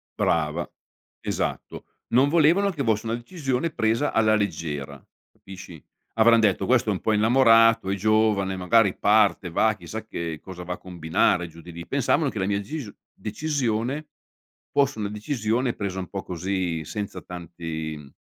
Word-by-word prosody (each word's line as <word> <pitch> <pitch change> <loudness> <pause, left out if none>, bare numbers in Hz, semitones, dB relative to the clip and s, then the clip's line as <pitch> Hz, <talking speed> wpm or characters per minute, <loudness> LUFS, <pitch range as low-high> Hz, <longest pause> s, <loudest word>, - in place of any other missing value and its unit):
Brava, 80 +1 0 0.5
esatto. - - -4 0.2
Non 130 +4 +4
volevano 170 +6 +4
che 150 -6 -3
fosse 110 -2 0
una 115 +1 -1
decisione 135 +2 -2
presa 115 +4 0
alla 110 -1 +4
leggera, 75 -9 -3 0.3
capisci? 95 -4 -12 0.3
Avran 115 +1 +6
detto: 105 -4 +2
"Questo 120 -3 +2
è - - +2
un 95 - -5
po' 110 - +1
innamorato, 115 -1 +5
è 100 - +1
giovane, 105 -2 +2
magari 95 +2 +3
parte, 100 -3 +3
va, 110 +5 +2
chissà 110 +1 -7
che 85 -7 -5
cosa 90 -2 -9
va 90 +1 -4
a - - -8
combinare 90 0 0
giù 85 0 -14
di 85 - -11
lì." 85 0 -8
Pensavano 140 +2 +1
che 110 - -5
la 95 - 0
mia 100 0 +1
decisio 115 +1 -6 0.2
decisione 130 +2 -2 0.6
fosse 140 -4 +1
una 105 -1 -2
decisione 115 +2 -1
presa 95 -2 -4
un 90 - -5
po' 100 -1 -5
così, 90 -2 -3
senza 105 +4 -5
tanti, 80 -3 -6
mhmm, 70 -2 -13
105 Hz, 160 wpm, -25 LUFS, 90-115 Hz, 0.6 s, Avran